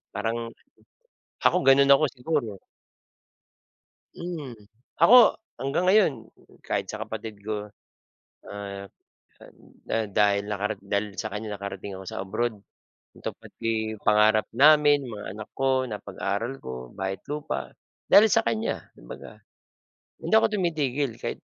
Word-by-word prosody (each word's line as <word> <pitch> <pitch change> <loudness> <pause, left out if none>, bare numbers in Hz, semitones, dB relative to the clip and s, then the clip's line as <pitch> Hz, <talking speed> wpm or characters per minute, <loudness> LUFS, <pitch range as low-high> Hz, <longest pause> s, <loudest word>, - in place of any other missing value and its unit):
parang 115 +1 -1 1.1
ako, - - +5
ganon 140 +1 +6
ako 140 +3 +3
siguro. 125 -6 -2 1.6
Hmm, 165 -8 -6 0.5
ako 210 +9 +8 0.4
hanggang 135 +6 -1
ngayon 205 -4 +5 0.5
kahit 100 -1 -2
sa 110 - -6
kapatid 110 -1 -7
ko, 105 0 -5 0.8
ah, 100 -1 -7 0.5
ah, - - -14 0.4
da 115 -1 0
dahil 100 0 +2
nakara 105 +1 -2
dahil 100 0 -3
sa 110 - -2
kanya, 105 0 -5
nakarating 100 0 -6
ako 95 - -9
sa - - -5
abroad. 110 +4 -2 0.6
Tupad - - -8
pi 110 -1 -1
pangarap 105 0 +4
namin, 145 +1 +5
mga 105 -3 -7
anak 105 +1 -8
ko 130 -1 +1
napag-aral 115 +3 -4
ko, 65 -1 -8
bahay 95 0 -3
at - - -29
lupa, 145 - -4 0.4
dahil 215 +2 +8
sa 225 +2 +3
kanya 220 0 -2
kumbaga. - - -11 0.8
Hindi - - 0
ako 220 - +5
tumitigil 145 - -1
kahit, - - -5
110 Hz, 125 wpm, -26 LUFS, 100-140 Hz, 1.6 s, ako